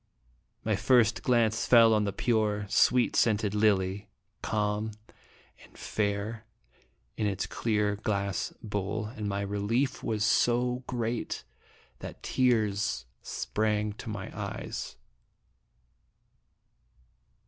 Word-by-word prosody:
My - - +2
first 115 -3 +3
glance 115 -4 +2
fell 115 -2 +7
on 105 -1 +2
the 100 - -1
pure, 105 -1 0
sweet 125 +2 +3
scented 105 -2 +2
lily, 100 -2 +1 0.3
calm 105 +1 -1 0.7
and - - -18
fair, 105 +1 -2 0.7
in 105 - 0
its 100 -2 -1
clear, 105 -2 0
glass 100 -3 -2
bowl, 105 0 -2
and 105 -2 -4
the 100 0 -2
relief 105 +7 -1
was 110 -2 -1
so 125 +3 +2
great 120 -1 -3 0.6
that - - -9
tears 105 - +1 0.2
sprang 105 -1 -1
to 110 - -8
my 100 -3 -6
eyes. - - -5
105 Hz, 105 wpm, -29 LUFS, 100-115 Hz, 0.7 s, fell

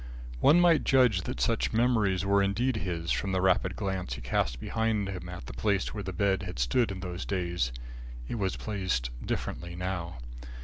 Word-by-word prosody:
One 150 - +6
might 175 -3 +5
judge 125 -8 +4
that - - -4
such - - +1
memories 110 -6 +2
were 100 0 +4
indeed 110 +6 +1
his, 85 -5 -3
from 95 -1 0
the 95 - +2
rapid 95 0 +2
glance 95 - -3
he - - -9
cast 60 0 0
behind 110 - 0
him 90 -2 -6
at 90 -1 -7
the - - -8
place 100 -2 0
where 105 - -4
the 95 - -4
bed 95 0 +1
had - - -6
stood 100 - +2
in 95 -1 -6
those 90 0 -4
days. 85 -9 -1 0.6
It 115 - -3
was 95 -2 0
placed 95 - -2
differently 85 0 -4
now. 90 -3 -4
95 Hz, 185 wpm, -29 LUFS, 85-105 Hz, 0.6 s, One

